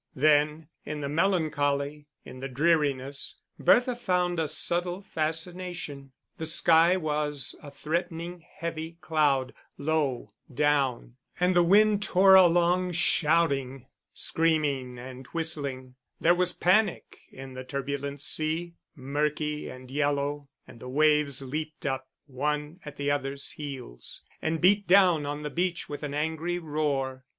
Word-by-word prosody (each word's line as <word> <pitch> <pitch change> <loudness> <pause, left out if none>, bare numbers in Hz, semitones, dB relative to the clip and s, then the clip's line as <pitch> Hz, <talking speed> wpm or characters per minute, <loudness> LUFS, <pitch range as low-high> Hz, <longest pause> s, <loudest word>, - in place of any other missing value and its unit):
Then, 150 +2 +3 0.2
in 150 0 -5
the 140 - -3
melancholy, 150 -4 0 0.2
in 130 - -10
the 135 - -4
dreariness, 140 -1 0 0.2
Bertha 245 0 +4
found 180 -6 0
a 160 - 0
subtle 175 +4 0
fascination. 160 -3 -4 0.3
The 160 - -3
sky 165 +2 +5
was 150 -5 -1
a 145 - -10
threatening 170 +3 -4
heavy 165 0 -5
cloud, 150 -5 +1 0.2
low 145 -4 -1 0.2
down; 135 -3 0 0.2
and 180 0 +2
the 175 - +6
wind 205 +4 +4
tore 195 -1 +5
along 180 0 +5
shouting, 145 -6 +1 0.3
screaming, 145 -6 0
and 130 +1 -9
whistling: 140 -6 -4 0.3
there 170 - +5
was 180 0 +1
panic 190 +3 +1
in 135 0 -10
the 130 0 -7
turbulent 140 +1 -4
sea, 160 +3 -1 0.2
murky 150 +2 -2
and 130 0 -11
yellow, 145 0 -1 0.2
and 115 - -14
the 125 - -8
waves 150 -1 +2
leaped 155 +4 -5
up, 135 -1 -2 0.2
one 150 +4 -3
at 150 -1 -9
the 145 0 -1
other's 140 -1 -3
heels, 135 - -8 0.2
and 160 0 -1
beat 200 +2 +4
down 180 -5 +5
on 145 +1 -4
the 150 - -4
beach 175 +1 -1
with 145 - -6
an 145 -2 -4
angry 160 +3 -1
roar. 145 -5 -2
150 Hz, 130 wpm, -27 LUFS, 140-170 Hz, 0.3 s, the